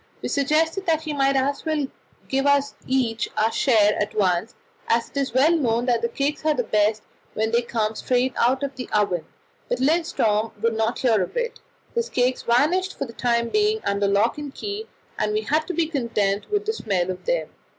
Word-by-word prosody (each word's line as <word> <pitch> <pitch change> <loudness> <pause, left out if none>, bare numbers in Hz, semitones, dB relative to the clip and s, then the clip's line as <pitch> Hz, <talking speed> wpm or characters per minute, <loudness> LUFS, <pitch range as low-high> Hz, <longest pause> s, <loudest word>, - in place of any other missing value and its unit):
We - - -2
suggested 320 +6 +1
that 320 -1 +2
he 310 - -3
might 275 -1 +2
just 275 +1 0
as - - -24
well 305 -3 0 0.4
give 270 +1 0
us 285 0 +3
each 245 -4 0
our 220 +1 +2
share 215 -4 +3
at 210 - -2
once, 185 -1 +1 0.3
as 230 0 +1
it - - -8
is 275 -1 0
well 280 +5 +5
known 240 -6 +1
that 240 -2 +1
the 235 - 0
cakes 285 +5 -2
are 310 -1 +2
best 215 -3 +1 0.3
when 220 +1 0
they 235 +1 +3
come 220 -2 -1
straight 250 +3 0
out 260 +3 +2
of 275 -1 -3
the 250 -1 -7
oven, 180 -6 +1 0.4
but 245 - 0
Lindström 240 -8 +1
would 230 +1 +1
not 225 +1 0
hear 225 -6 +2
of 180 - -4
it. 480 0 -2 0.3
His 470 0 -1
cakes 250 +1 +1
vanished 320 +11 +1
for - - -2
the 230 - -11
time 235 -1 0
being 425 +1 +2
under 200 0 +1
lock 210 +7 +2
and 290 -2 -6
key, 415 +7 -5 0.3
and 210 0 0
we 215 - +1
had 310 +7 0
to 365 - -3
be 335 0 +2
content 230 -9 -1
with 415 0 0
the 440 - 0
smell 190 - -1
of 180 - -8
them. - - 0
250 Hz, 210 wpm, -23 LUFS, 220-300 Hz, 0.4 s, well